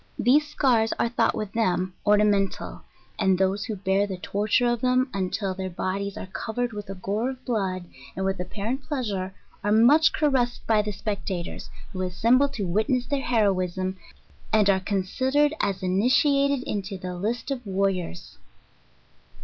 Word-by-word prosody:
These 295 Hz, +4 st, +3 dB
Bears 230 Hz, -5 st, +3 dB
are 235 Hz, -, +1 dB
thought 240 Hz, -, +1 dB
with 210 Hz, -2 st, -4 dB
them 185 Hz, -4 st, 0 dB
ornamen 205 Hz, -1 st, +4 dB
tal, -, -, -9 dB, 0.4 s
and 190 Hz, -1 st, +3 dB
those 195 Hz, +2 st, +1 dB
who 215 Hz, -, -3 dB
bear 195 Hz, +1 st, +1 dB
the 190 Hz, -2 st, -5 dB
torture 210 Hz, +6 st, +1 dB
of 240 Hz, -1 st, +1 dB
them 255 Hz, +1 st, +2 dB
until 195 Hz, 0 st, -1 dB
their 190 Hz, 0 st, -4 dB
bod 185 Hz, +2 st, -2 dB
ides 200 Hz, 0 st, -5 dB
are -, -, -5 dB
covered 225 Hz, +5 st, -3 dB
with 205 Hz, -1 st, -7 dB
a 195 Hz, -, -5 dB
gore 205 Hz, +6 st, -2 dB
of 260 Hz, -1 st, -8 dB
blood, 190 Hz, -6 st, -1 dB, 0.3 s
and 190 Hz, -, -2 dB
with 195 Hz, -1 st, -1 dB
apparent 205 Hz, +8 st, -3 dB
pleasure, 210 Hz, -10 st, -3 dB, 0.3 s
are 205 Hz, -, +1 dB
much 240 Hz, +9 st, +6 dB
caressed 260 Hz, -5 st, 0 dB
by 220 Hz, -2 st, +3 dB
the 210 Hz, 0 st, -3 dB
spectaters, 195 Hz, -4 st, -4 dB, 0.2 s
who 185 Hz, -, -4 dB
assemble 230 Hz, +10 st, +3 dB
to 230 Hz, -8 st, -4 dB
witness 220 Hz, +8 st, +1 dB
their 280 Hz, +2 st, -1 dB
heroism, 190 Hz, -5 st, 0 dB, 0.5 s
and 210 Hz, -2 st, +5 dB
are 190 Hz, -, +2 dB
considered 260 Hz, +10 st, +1 dB
as 190 Hz, -2 st, -1 dB
initiated 265 Hz, +8 st, +3 dB
in 210 Hz, -, -2 dB
into 195 Hz, 0 st, -5 dB
the 180 Hz, 0 st, -5 dB
list 220 Hz, +9 st, -3 dB
of 255 Hz, -2 st, -3 dB
warriors. 190 Hz, -, -2 dB
205 Hz, 165 wpm, -25 LUFS, 190-245 Hz, 0.5 s, much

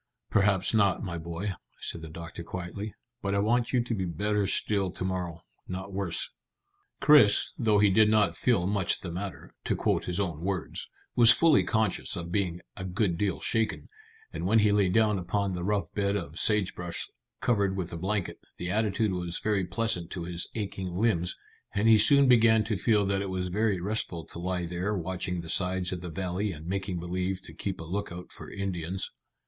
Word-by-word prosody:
"Perhaps 100 Hz, -1 st, +3 dB
not, 100 Hz, -3 st, +3 dB
my 85 Hz, -4 st, -4 dB
boy," 85 Hz, +5 st, -4 dB, 0.3 s
said 85 Hz, -, -3 dB
the 80 Hz, -, -8 dB
doctor 85 Hz, +1 st, -8 dB
quietly, 90 Hz, +5 st, -6 dB, 0.3 s
"but 100 Hz, 0 st, -1 dB
I -, -, +2 dB
want 115 Hz, +4 st, +1 dB
you 125 Hz, -2 st, +2 dB
to 120 Hz, -, -3 dB
be 95 Hz, -4 st, -1 dB
better 105 Hz, +4 st, 0 dB
still 100 Hz, -1 st, +1 dB
to 90 Hz, -, -5 dB
morrow, 90 Hz, -3 st, -3 dB, 0.3 s
not 95 Hz, +2 st, -6 dB
worse." 95 Hz, -4 st, 0 dB, 0.7 s
Chris, 145 Hz, -9 st, +5 dB
though 110 Hz, -3 st, +2 dB
he 105 Hz, -1 st, +5 dB
did 110 Hz, +2 st, +5 dB
not 105 Hz, -2 st, +3 dB
feel 115 Hz, -9 st, +2 dB
much 100 Hz, -2 st, 0 dB
the 85 Hz, -, -5 dB
matter, 95 Hz, +2 st, -6 dB
to -, -, +1 dB
quote -, -, 0 dB
his 90 Hz, +1 st, -2 dB
own 85 Hz, -6 st, -2 dB
words, 95 Hz, -2 st, -2 dB, 0.3 s
was 120 Hz, -2 st, +8 dB
fully 155 Hz, +3 st, +6 dB
conscious 110 Hz, -4 st, 0 dB
of 85 Hz, 0 st, -5 dB
being 90 Hz, -3 st, -1 dB
a 95 Hz, -, -6 dB
good 95 Hz, 0 st, 0 dB
deal 95 Hz, +1 st, -1 dB
shaken, 115 Hz, -1 st, 0 dB, 0.4 s
and -, -, -3 dB
when 110 Hz, +3 st, +4 dB
he 105 Hz, -1 st, +4 dB
lay 100 Hz, -2 st, +3 dB
down 105 Hz, 0 st, +3 dB
upon 95 Hz, +2 st, -1 dB
the 90 Hz, -1 st, -4 dB
rough 105 Hz, +1 st, -1 dB
bed 100 Hz, -1 st, 0 dB
of 85 Hz, -4 st, -4 dB
sage 105 Hz, -3 st, +3 dB
brush 90 Hz, -1 st, -3 dB, 0.3 s
covered 100 Hz, -5 st, +1 dB
with 90 Hz, -2 st, -3 dB
a -, -, -4 dB
blanket, 95 Hz, +2 st, -2 dB, 0.2 s
the 90 Hz, +1 st, -3 dB
attitude 105 Hz, 0 st, +1 dB
was 90 Hz, -2 st, -2 dB
very 100 Hz, -4 st, 0 dB
pleasant 95 Hz, -4 st, -1 dB
to 90 Hz, -, -5 dB
his 85 Hz, 0 st, -2 dB
aching 95 Hz, -4 st, -4 dB
limbs, 90 Hz, -4 st, +1 dB, 0.4 s
and 100 Hz, +2 st, +2 dB
he 110 Hz, -1 st, +7 dB
soon 140 Hz, +5 st, +6 dB
began 115 Hz, -3 st, +5 dB
to 110 Hz, 0 st, -1 dB
feel 105 Hz, +1 st, +3 dB
that 95 Hz, 0 st, +1 dB
it 100 Hz, -, -3 dB
was 90 Hz, -1 st, -2 dB
very 105 Hz, 0 st, +1 dB
restful 90 Hz, -4 st, -3 dB
to 85 Hz, -, -8 dB
lie 90 Hz, 0 st, -2 dB
there 90 Hz, +4 st, -2 dB
watching 90 Hz, 0 st, -2 dB
the 85 Hz, -, -10 dB
sides 90 Hz, +1 st, 0 dB
of 90 Hz, -2 st, -4 dB
the 90 Hz, -, -6 dB
valley 95 Hz, +4 st, -2 dB
and 80 Hz, -2 st, -9 dB
making 95 Hz, 0 st, -2 dB
believe 90 Hz, +2 st, -2 dB
to -, -, -12 dB
keep 95 Hz, -2 st, -4 dB
a -, -, -5 dB
lookout 90 Hz, 0 st, -5 dB
for -, -, -10 dB
Indians. 95 Hz, -2 st, -3 dB
95 Hz, 195 wpm, -28 LUFS, 90-105 Hz, 0.7 s, was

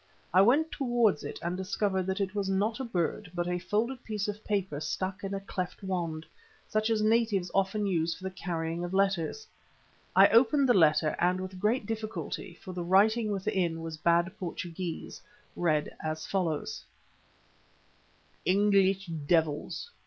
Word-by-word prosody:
I 185 Hz, -, +7 dB
went 285 Hz, +10 st, +4 dB
towards 240 Hz, -, +1 dB
it -, -, -5 dB
and 175 Hz, +1 st, -1 dB
discovered 190 Hz, 0 st, -1 dB
that 190 Hz, +2 st, -1 dB
it 195 Hz, -1 st, -1 dB
was 200 Hz, -2 st, -1 dB
not 205 Hz, +5 st, 0 dB
a -, -, -2 dB
bird 190 Hz, -3 st, -2 dB
but 175 Hz, 0 st, -1 dB
a 180 Hz, 0 st, -1 dB
folded 220 Hz, +8 st, -1 dB
piece 210 Hz, -2 st, -3 dB
of 210 Hz, +1 st, -5 dB
paper 190 Hz, -8 st, -1 dB
stuck 185 Hz, +5 st, -3 dB
in 195 Hz, 0 st, -3 dB
a -, -, -2 dB
cleft 190 Hz, 0 st, -5 dB
wand, 170 Hz, -4 st, -3 dB, 0.4 s
such 215 Hz, +1 st, 0 dB
as 220 Hz, -1 st, +1 dB
natives 215 Hz, -5 st, +2 dB
often 195 Hz, +2 st, +1 dB
use 165 Hz, -4 st, 0 dB
for -, -, -14 dB
the 190 Hz, -, -3 dB
carrying 170 Hz, -2 st, -3 dB
of 175 Hz, +2 st, -3 dB
letters. 195 Hz, -, +1 dB, 0.7 s
I -, -, +9 dB
opened 265 Hz, +4 st, +5 dB
the 245 Hz, -, +5 dB
paper 155 Hz, -4 st, +4 dB
and 180 Hz, +1 st, +2 dB
with 185 Hz, 0 st, -6 dB
great 215 Hz, +4 st, +1 dB
difficulty, 215 Hz, -4 st, -5 dB
for 185 Hz, -, -9 dB
the 175 Hz, -1 st, -3 dB
writing 215 Hz, +5 st, +4 dB
within 190 Hz, -5 st, -1 dB
was 165 Hz, -1 st, -5 dB
bad 170 Hz, +4 st, +2 dB
Portuguese, 175 Hz, -1 st, -5 dB, 0.3 s
read 155 Hz, -4 st, 0 dB
as 155 Hz, 0 st, -3 dB
follows: 170 Hz, -6 st, -2 dB, 1.6 s
"English 195 Hz, 0 st, +3 dB
Devils. 160 Hz, -, -1 dB
190 Hz, 160 wpm, -29 LUFS, 175-210 Hz, 1.6 s, I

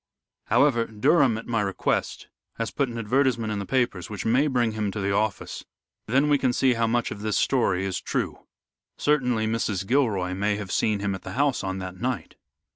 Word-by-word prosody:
However, 120 Hz, -5 st, +3 dB
Durham, 125 Hz, +2 st, +3 dB
at 115 Hz, -, -7 dB
my 115 Hz, -2 st, 0 dB
request, 100 Hz, -2 st, -1 dB, 0.3 s
has 115 Hz, -1 st, -2 dB
put 140 Hz, -3 st, 0 dB
an 120 Hz, -, -6 dB
advertisement 115 Hz, -1 st, +1 dB
in 105 Hz, -, -3 dB
the 100 Hz, -, -5 dB
papers 120 Hz, -9 st, 0 dB
which 105 Hz, -3 st, -5 dB
may 125 Hz, +6 st, +3 dB
bring 120 Hz, -5 st, +1 dB
him 110 Hz, -1 st, -2 dB
to 105 Hz, -, -5 dB
the 100 Hz, 0 st, 0 dB
office, 105 Hz, 0 st, -2 dB, 0.4 s
then 135 Hz, +6 st, +3 dB
we 145 Hz, -1 st, +3 dB
can 130 Hz, -2 st, +1 dB
see 130 Hz, 0 st, +3 dB
how 115 Hz, -1 st, +1 dB
much 120 Hz, +1 st, 0 dB
of 100 Hz, -, -6 dB
this 105 Hz, -1 st, 0 dB
story 95 Hz, -8 st, +1 dB
is 95 Hz, -2 st, -2 dB
true. -, -, -3 dB, 0.5 s
Certainly, 125 Hz, -7 st, +1 dB
Mrs. 110 Hz, -4 st, -1 dB
Gilroy 100 Hz, -7 st, +1 dB
may 105 Hz, +2 st, 0 dB
have 100 Hz, -3 st, -6 dB
seen 105 Hz, -2 st, +1 dB
him 100 Hz, -1 st, -1 dB
at 95 Hz, -, -6 dB
the -, -, -7 dB
house 140 Hz, -3 st, +1 dB
on 95 Hz, 0 st, -3 dB
that 95 Hz, -1 st, -6 dB
night." 125 Hz, -1 st, -2 dB
115 Hz, 200 wpm, -25 LUFS, 100-125 Hz, 0.5 s, However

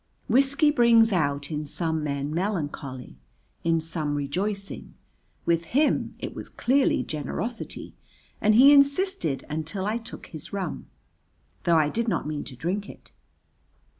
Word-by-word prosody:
Whiskey 275 Hz, +5 st, +4 dB
brings 235 Hz, -4 st, +5 dB
out 145 Hz, -5 st, 0 dB
in 150 Hz, -1 st, -3 dB
some 160 Hz, 0 st, -2 dB
men 140 Hz, 0 st, -2 dB
melancholy, 145 Hz, -, -3 dB, 0.4 s
in 165 Hz, 0 st, +2 dB
some 155 Hz, -2 st, -3 dB
rejoicing, 195 Hz, +8 st, -3 dB, 0.5 s
with 170 Hz, 0 st, +1 dB
him 300 Hz, +1 st, +2 dB
it -, -, -6 dB
was -, -, -6 dB
clearly 265 Hz, +3 st, +2 dB
generosity 225 Hz, +10 st, -5 dB, 0.5 s
and 215 Hz, 0 st, +4 dB
he 275 Hz, +5 st, +9 dB
insisted 280 Hz, -, +2 dB
until 160 Hz, +6 st, -4 dB
I 220 Hz, +3 st, 0 dB
took 225 Hz, -, -10 dB
his 155 Hz, -3 st, -9 dB
rum, 190 Hz, -5 st, -4 dB, 0.8 s
though 170 Hz, -1 st, +5 dB
I 155 Hz, -2 st, +3 dB
did 230 Hz, +7 st, -2 dB
not 185 Hz, -7 st, 0 dB
mean 150 Hz, -1 st, -3 dB
to 130 Hz, -, -9 dB
drink 185 Hz, +9 st, -3 dB
it. -, -, -14 dB
175 Hz, 135 wpm, -26 LUFS, 150-230 Hz, 0.8 s, he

